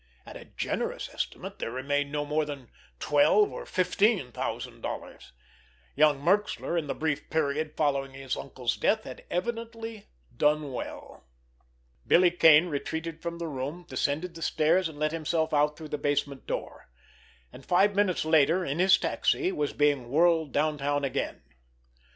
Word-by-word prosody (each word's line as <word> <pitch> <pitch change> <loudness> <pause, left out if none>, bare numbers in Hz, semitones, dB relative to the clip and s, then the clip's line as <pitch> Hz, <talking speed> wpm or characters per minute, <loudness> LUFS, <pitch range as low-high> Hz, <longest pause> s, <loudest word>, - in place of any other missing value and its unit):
At - - -11
a - - -10
generous - - -4
estimate - - -5
there - - -3
remained 140 +3 -1
no 145 0 -2
more 150 +1 0
than 140 -5 -8 0.3
twelve 150 - +4
or - - -7
fifteen 185 - +1
thousand - - -5
dollars. - - -7 0.6
Young 150 -1 +4
Merxler, 190 +2 0
in 165 -3 -1
the - - -3
brief 155 -2 -2
period 155 0 -1
following 140 -3 0
his 135 -1 -4
uncle's 125 -3 -3
death, 220 +1 +1
had - - -9
evidently 225 +1 -4 0.3
done 150 +1 +1
well! 65 - -8 0.8
Billy 180 0 +5
Kane 165 -2 +6
retreated 160 +1 -4
from 170 0 -4
the 170 - -4
room, 145 +5 -5
descended 145 +6 -2
the 165 - -10
stairs, 165 +3 +2
and 150 - -12
let 155 0 0
himself 160 0 -1
out 150 0 +2
through 155 -2 -9
the 150 - -3
basement 145 -1 -1
door—and 65 - -9
five 195 +6 +3
minutes 200 -5 +1
later, 160 +3 +3
in 145 +2 -3
his 190 +1 +6
taxi, 370 -1 0
was 145 -1 -1
being 145 -5 +1
whirled 160 +1 +3
downtown 145 -1 0
again. 135 - -3
155 Hz, 150 wpm, -28 LUFS, 145-175 Hz, 0.8 s, Kane